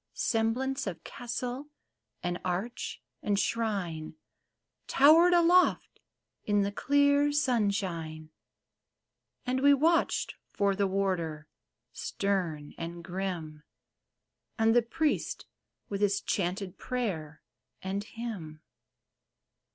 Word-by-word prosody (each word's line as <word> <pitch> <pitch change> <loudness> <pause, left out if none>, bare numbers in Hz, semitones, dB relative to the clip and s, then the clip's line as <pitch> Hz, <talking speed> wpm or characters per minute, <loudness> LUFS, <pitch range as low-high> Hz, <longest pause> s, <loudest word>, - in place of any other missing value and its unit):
Semblance 250 +4 0
of 185 - -5
castle 245 +3 -5 0.6
and 175 0 -2
arch 185 +6 -3 0.2
and 205 -1 +1
shrine 195 -9 -1 0.7
Towered 320 +6 +6
aloft 350 +1 +4 0.4
in 205 -1 +2
the 200 - -1
clear 285 +4 +3
sunshine; 195 - -1 1.1
And 255 0 0
we 285 +1 +7
watched 330 +4 +2 0.2
for 200 -1 +1
the 200 0 +1
warder, 175 -6 -1 0.5
stern 175 -7 -2
and 170 +1 -6
grim, 175 -4 -4 1.0
And 225 0 +4
the 240 - +7
priest 305 +6 -1 0.4
with 200 0 -4
his 200 -1 +3
chanted 185 0 -2
prayer 175 - -3 0.4
and 195 +2 -2
hymn. 210 -10 -7
200 Hz, 95 wpm, -30 LUFS, 175-250 Hz, 1.1 s, we